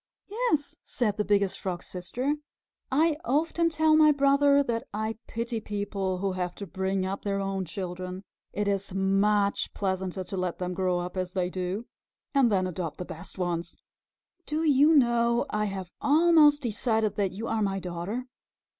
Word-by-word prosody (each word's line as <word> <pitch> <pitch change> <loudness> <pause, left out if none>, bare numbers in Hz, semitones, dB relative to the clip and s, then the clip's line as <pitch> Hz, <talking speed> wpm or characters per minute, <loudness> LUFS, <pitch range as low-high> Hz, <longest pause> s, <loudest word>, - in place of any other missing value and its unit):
'" - - -66
"Yes," 415 - -1
said 215 -5 -1
the 210 - +1
Biggest 200 -2 +1
Frog's 180 -2 -4
Sister. 245 +10 -2 0.6
"I 305 +3 +3
often 330 +3 +1
tell 315 -1 +3
my 310 -1 +7
brother 280 0 +4
that 235 -3 -2
I 220 +1 -3
pity 230 0 -3
people 200 -3 -3
who 195 +1 -1
have 180 -1 -3
to 200 - -6
bring 190 +1 -1
up 195 +1 -3
their 200 -1 -1
own 195 -1 -2
children. 185 +1 -5 0.3
It 205 0 -2
is 200 -1 -1
much 200 +1 +2
pleasanter 190 -1 -2
to 190 +2 -6
let 180 -2 -2
them 180 0 -3
grow 185 -1 0
up 180 +1 -5
as 185 -1 -2
they 180 -1 -1
do 185 +5 -3 0.5
and 270 -5 +4
then 185 -2 +2
adopt 175 -4 -4
the 180 - -5
best 170 +4 -10
ones. 175 -2 -3 0.7
Do 310 +2 -1
you 300 +1 +5
know, 235 -3 +3
I 210 0 0
have 190 -3 -5
almost 300 -1 +5
decided 220 -1 0
that 195 -3 0
you 220 +4 -5
are 225 -1 0
my 195 -2 0
daughter? 180 +7 -4
200 Hz, 170 wpm, -28 LUFS, 185-260 Hz, 0.7 s, my